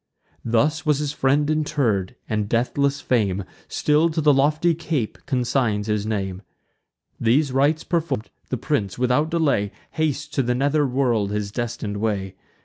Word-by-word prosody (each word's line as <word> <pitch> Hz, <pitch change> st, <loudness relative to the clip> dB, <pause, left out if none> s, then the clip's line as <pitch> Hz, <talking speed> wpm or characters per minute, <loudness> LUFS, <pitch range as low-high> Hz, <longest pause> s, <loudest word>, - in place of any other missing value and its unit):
Thus 145 Hz, +8 st, +1 dB
was 150 Hz, -4 st, +2 dB
his 145 Hz, -1 st, -2 dB
friend 145 Hz, +1 st, +2 dB
interr'd; 145 Hz, -11 st, 0 dB
and 105 Hz, -2 st, -1 dB
deathless 140 Hz, +4 st, +1 dB
fame 100 Hz, -6 st, +1 dB, 0.2 s
Still 150 Hz, +3 st, +2 dB
to 160 Hz, 0 st, -2 dB
the 150 Hz, -1 st, +5 dB
lofty 150 Hz, +5 st, +3 dB
cape 155 Hz, -8 st, -3 dB
consigns 120 Hz, -5 st, 0 dB
his 105 Hz, -1 st, -1 dB
name. 95 Hz, -3 st, -2 dB, 0.8 s
These 130 Hz, +5 st, +2 dB
rites 145 Hz, +4 st, +2 dB
perform'd, 160 Hz, -, -2 dB, 0.2 s
the -, -, -1 dB
prince, 100 Hz, -2 st, -1 dB
without 125 Hz, +5 st, +2 dB
delay, 145 Hz, -12 st, +1 dB, 0.2 s
Hastes 150 Hz, -2 st, -1 dB
to 140 Hz, -, 0 dB
the 125 Hz, -1 st, 0 dB
nether 145 Hz, +3 st, +2 dB
world 120 Hz, -6 st, +1 dB
his 105 Hz, -1 st, -2 dB
destin'd 115 Hz, -3 st, -3 dB
way. 100 Hz, -3 st, -2 dB
130 Hz, 145 wpm, -23 LUFS, 110-150 Hz, 0.8 s, the